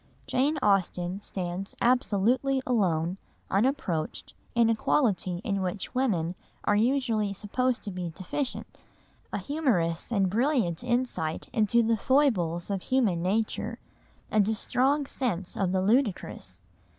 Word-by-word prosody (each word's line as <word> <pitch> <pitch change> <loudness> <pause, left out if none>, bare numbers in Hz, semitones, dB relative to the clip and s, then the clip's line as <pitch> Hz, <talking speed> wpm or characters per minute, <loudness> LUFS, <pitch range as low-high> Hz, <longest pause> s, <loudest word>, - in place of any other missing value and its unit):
Jane 285 +5 +1
Austen 185 -2 +1
stands 185 0 -4
absolutely 250 +2 +2
alone, 185 -6 +1 0.3
unapproached, 195 - -1 0.2
in 235 -1 +5
a 230 - +3
quality 195 -8 +1
in 200 -5 -1
which 185 +4 -3
women 195 -11 0 0.3
are 205 - +2
usually 225 -3 +1
supposed 245 +5 -1
to 205 - -4
be 180 -2 -4
deficient, 195 - -5 0.5
a - - -2
humorous 235 - 0
and 200 -4 +2
brilliant 225 - +1
insight 240 -10 -1
into 235 0 +3
the 225 0 +2
foibles 200 - +2
of 195 -2 -1
human 220 -10 +1
nature, 210 +5 -1 0.5
and 215 -1 +3
a 220 - +1
strong 275 +7 +1
sense 205 -10 -2
of 190 -3 0
the 185 0 +1
ludicrous. 220 0 0
210 Hz, 125 wpm, -28 LUFS, 180-250 Hz, 0.5 s, in